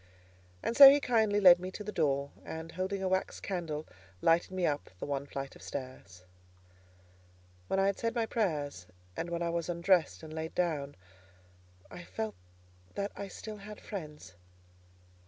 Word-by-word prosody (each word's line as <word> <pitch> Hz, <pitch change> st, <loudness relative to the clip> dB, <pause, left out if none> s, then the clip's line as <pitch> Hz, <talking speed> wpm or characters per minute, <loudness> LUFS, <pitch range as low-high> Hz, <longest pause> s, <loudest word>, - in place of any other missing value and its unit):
And 235 Hz, -, -1 dB
so 275 Hz, +1 st, +13 dB
he 285 Hz, +1 st, +5 dB
kindly 220 Hz, -6 st, +2 dB
led 180 Hz, -3 st, +8 dB
me 185 Hz, +1 st, -5 dB
to 210 Hz, -, -6 dB
the 210 Hz, -, -5 dB
door, 140 Hz, -5 st, 0 dB
and 160 Hz, 0 st, -7 dB
holding 190 Hz, +2 st, -3 dB
a -, -, +1 dB
wax 190 Hz, 0 st, -1 dB
candle, 160 Hz, -5 st, -4 dB, 0.3 s
lighted 165 Hz, -, +3 dB
me 185 Hz, -1 st, -1 dB
up 145 Hz, -2 st, -1 dB
the -, -, -4 dB
one 140 Hz, 0 st, -3 dB
flight 135 Hz, -1 st, -6 dB
of -, -, -15 dB
stairs. 130 Hz, -10 st, -8 dB, 1.4 s
When 195 Hz, -, 0 dB
I 195 Hz, -, +3 dB
had 200 Hz, 0 st, 0 dB
said 230 Hz, +1 st, -1 dB
my 230 Hz, -1 st, +1 dB
prayers, 150 Hz, -, -2 dB, 0.3 s
and 170 Hz, -, -3 dB
when 170 Hz, 0 st, -2 dB
I 170 Hz, -, 0 dB
was 170 Hz, 0 st, -2 dB
undressed 170 Hz, -1 st, +2 dB
and 155 Hz, 0 st, -9 dB
laid 160 Hz, 0 st, -5 dB
down, 150 Hz, -5 st, -1 dB, 1.0 s
I 90 Hz, -1 st, -8 dB
felt 100 Hz, +5 st, -4 dB, 0.6 s
that 200 Hz, 0 st, -2 dB
I 200 Hz, -, -5 dB
still 215 Hz, +3 st, -8 dB
had 210 Hz, +1 st, -10 dB
friends. 150 Hz, -, -8 dB
170 Hz, 170 wpm, -31 LUFS, 145-200 Hz, 1.4 s, so